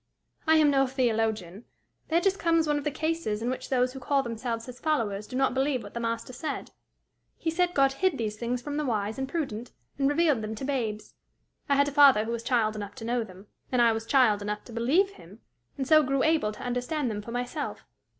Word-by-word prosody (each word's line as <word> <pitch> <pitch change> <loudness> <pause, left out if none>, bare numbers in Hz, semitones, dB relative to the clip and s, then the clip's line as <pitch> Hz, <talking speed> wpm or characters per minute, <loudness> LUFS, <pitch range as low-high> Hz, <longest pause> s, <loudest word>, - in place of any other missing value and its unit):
"I 320 - +6
am 305 -2 +5
no 270 -1 +3
theologian. 225 -6 -1 0.4
There 330 +1 +3
just 390 +2 +1
comes 330 -1 +3
one 295 -1 +1
of - - -7
the - - +2
cases 305 -8 -2
in 245 - 0
which 260 - -5
those 255 -1 +1
who 265 - -7
call 275 +1 +1
themselves 230 -1 -4
his 250 -1 -10
followers 220 -10 -1
do - - -8
not 265 -1 +2
believe 265 -1 0
what - - -10
the 235 - -3
Master 230 +1 -3
said: 310 +5 -5 0.7
he 325 - -2
said 355 +1 +1
God 275 -1 +4
hid 375 +5 +1
these 215 -2 -2
things 240 +2 -3
from 290 +1 -4
the 300 - 0
wise 215 -2 -1
and 265 0 -3
prudent, 250 -8 -4 0.3
and 275 0 +3
revealed 295 -5 +2
them 215 +1 -4
to 240 - -5
babes. 230 -6 -3 0.6
I 280 - +4
had 280 +1 +4
a - - -2
father 275 -7 +6
who 230 - -3
was 235 -1 -2
child 230 -3 +1
enough 205 -1 -6
to 225 - -8
know 240 0 0
them, 190 -1 -13 0.3
and 250 - +2
I 235 -1 +6
was 225 0 -3
child 240 -7 +4
enough 210 +1 -4
to 235 - -12
believe 295 - +2
him, 205 - -15 0.4
and 265 -2 -2
so 310 0 +7
grew 275 -1 0
able 315 -9 +2
to - - -10
understand 250 +2 -1
them 210 -1 -4
for 210 - -10
myself. 245 +1 -4
250 Hz, 230 wpm, -28 LUFS, 225-290 Hz, 0.7 s, so